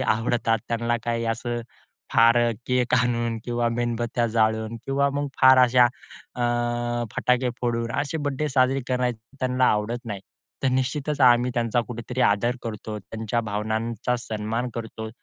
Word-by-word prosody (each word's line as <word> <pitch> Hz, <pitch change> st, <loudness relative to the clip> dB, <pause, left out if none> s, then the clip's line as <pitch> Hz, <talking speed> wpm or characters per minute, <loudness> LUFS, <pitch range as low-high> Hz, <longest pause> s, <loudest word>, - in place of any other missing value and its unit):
आवडतात. 115 Hz, -1 st, +1 dB
त्यांना 120 Hz, 0 st, 0 dB
काही 115 Hz, 0 st, -1 dB
असं 120 Hz, 0 st, -4 dB, 0.5 s
फार 115 Hz, +1 st, +6 dB, 0.3 s
केक 125 Hz, -1 st, +1 dB
आणून 120 Hz, -2 st, +1 dB
किंवा 120 Hz, -1 st, 0 dB
मेणबत्त्या 120 Hz, 0 st, -1 dB
जाळून 110 Hz, 0 st, +1 dB
किंवा 140 Hz, +1 st, +2 dB
मग 145 Hz, 0 st, -1 dB
फार 130 Hz, 0 st, +8 dB
अशा 125 Hz, 0 st, +6 dB, 0.5 s
अ, 125 Hz, -, -3 dB, 0.7 s
फटाके 125 Hz, 0 st, +1 dB
फोडून, 115 Hz, -1 st, -1 dB
असे 145 Hz, +3 st, -3 dB
बर्थडे 145 Hz, +2 st, -1 dB
साजरे 130 Hz, 0 st, +2 dB
करण्याचं, 125 Hz, -2 st, 0 dB, 0.2 s
त्यांना 130 Hz, 0 st, +1 dB
आवडत 115 Hz, +4 st, -2 dB
नाही. 100 Hz, -4 st, -5 dB, 0.4 s
तर 135 Hz, -, +3 dB
निश्चितचं 135 Hz, +3 st, -1 dB
आम्ही 120 Hz, 0 st, +5 dB
त्यांचा 120 Hz, 0 st, +1 dB
कुठेतरी 120 Hz, +2 st, -5 dB
आदर 120 Hz, +5 st, +2 dB
करतो, 110 Hz, -1 st, -5 dB
त्यांच्या 110 Hz, +3 st, -3 dB
भावनांचा 110 Hz, +3 st, -2 dB
सन्मान 115 Hz, +2 st, -3 dB
करतो. 110 Hz, -1 st, -6 dB
120 Hz, 140 wpm, -24 LUFS, 115-125 Hz, 0.7 s, फार